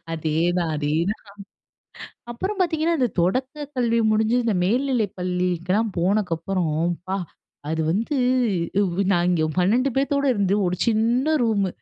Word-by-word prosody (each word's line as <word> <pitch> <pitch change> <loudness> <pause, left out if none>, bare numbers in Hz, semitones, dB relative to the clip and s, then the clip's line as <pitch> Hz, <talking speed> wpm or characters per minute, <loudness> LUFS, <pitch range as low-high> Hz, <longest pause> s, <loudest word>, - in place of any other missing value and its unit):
அதேதான் 165 +2 0
அதேதான். 160 +7 -1 1.1
அப்புறம் 380 - -4
பாத்தீங்கன்னா 330 -1 +1
இந்த 250 - +3
தொடக்க 260 - -1
கல்வி 235 -2 +1
முடிஞ்சு 220 +2 +2
இந்த 220 - +1
மேல்நிலை 245 +2 +1
பள்ளிக்கெல்லாம் 180 +3 -1
போனக்கப்புறம் 180 -2 0 0.2
அப்பா, 185 +3 -5 0.5
அது 160 0 -1
வந்து 225 - -1 1.0
நாங்க 175 0 +2 0.2
இங்க - - +2
12 235 +9 +2
பேத்தோட 280 +1 +1
இருந்து 200 0 +1
ஒரு 180 - -1
சின்ன 240 +7 +2
ரூம். 205 -4 +1
205 Hz, 115 wpm, -23 LUFS, 175-250 Hz, 1.1 s, இந்த